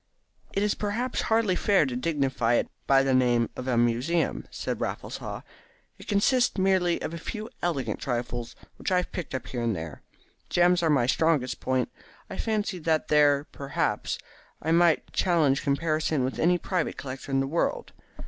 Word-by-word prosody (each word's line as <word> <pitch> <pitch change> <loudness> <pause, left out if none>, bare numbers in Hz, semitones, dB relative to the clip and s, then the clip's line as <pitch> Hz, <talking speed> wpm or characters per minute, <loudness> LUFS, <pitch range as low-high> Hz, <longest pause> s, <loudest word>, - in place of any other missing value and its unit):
"It 200 - 0
is 210 - +2
perhaps 230 +5 -2
hardly 220 -4 +3
fair 195 -3 +3
to 130 -2 -3
dignify 135 -4 +1
it - - +1 0.2
by 135 0 +5
the 135 -1 +1
name 120 -2 +3
of 130 - -6
a 125 -2 +1
museum," 120 +8 +1
said - - -4
Raffles - - -3
Haw. - - -6 0.6
"It - - -12
consists 235 +5 +2
merely 185 -2 +2
of - - -4
a 170 - -5
few 215 +5 -6
elegant 135 -11 -1
trifles 120 -1 -3 0.2
which - - -3
I 185 - +4
have 180 - -1
picked 170 -7 -5
up 130 - -4
here 120 - -4
and 115 -3 0
there. 80 -3 -7 0.5
Gems 175 0 +4
are 165 - +2
my 135 -5 +3
strongest 145 -1 +1
point. 130 -2 0 0.4
I - - -5
fancy 210 -4 -1
that 160 -1 0
there, 145 -2 +4
perhaps, 140 -1 -2 0.4
I 160 - -2
might 170 -1 +3
challenge 155 -6 +2
comparison 155 0 0
with 125 -2 -3
any 175 +5 +4
private 175 -1 -2
collector 130 +1 -7
in 135 - +2
the 135 - +1
world. 170 - -1
155 Hz, 175 wpm, -27 LUFS, 130-180 Hz, 0.6 s, by